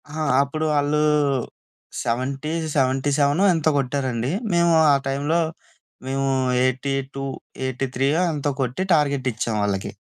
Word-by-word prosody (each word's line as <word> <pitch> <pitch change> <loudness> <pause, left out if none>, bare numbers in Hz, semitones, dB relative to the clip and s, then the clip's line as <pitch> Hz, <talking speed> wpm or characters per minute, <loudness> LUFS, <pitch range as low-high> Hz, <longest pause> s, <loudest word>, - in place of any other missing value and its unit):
ఆ! 155 +2 -6 0.2
అప్పుడు 155 +3 -3
ఆళ్ళు 145 +1 +1 1.0
70 135 +5 -2 0.2
సెవెంటీ 135 0 +1
సెవెనో 145 +6 +3
ఎంతో 160 -2 +1
కొట్టారండి. 130 -2 -1 0.2
మేము 170 0 +3 0.2
ఆ - - +5
టైంలో 145 +5 0 0.7
మేము 135 +1 -1 0.3
82 135 +1 -2 0.4
ఎయిటీ 130 +1 -2
త్రీయో 140 +6 +2
ఎంతో 145 -1 -1
కొట్టి, 130 +8 -1
టార్గెట్ 140 -4 +1
ఇచ్చాం 115 0 -2
వాళ్ళకి. 100 -1 -2
135 Hz, 120 wpm, -22 LUFS, 130-145 Hz, 1.0 s, ఆ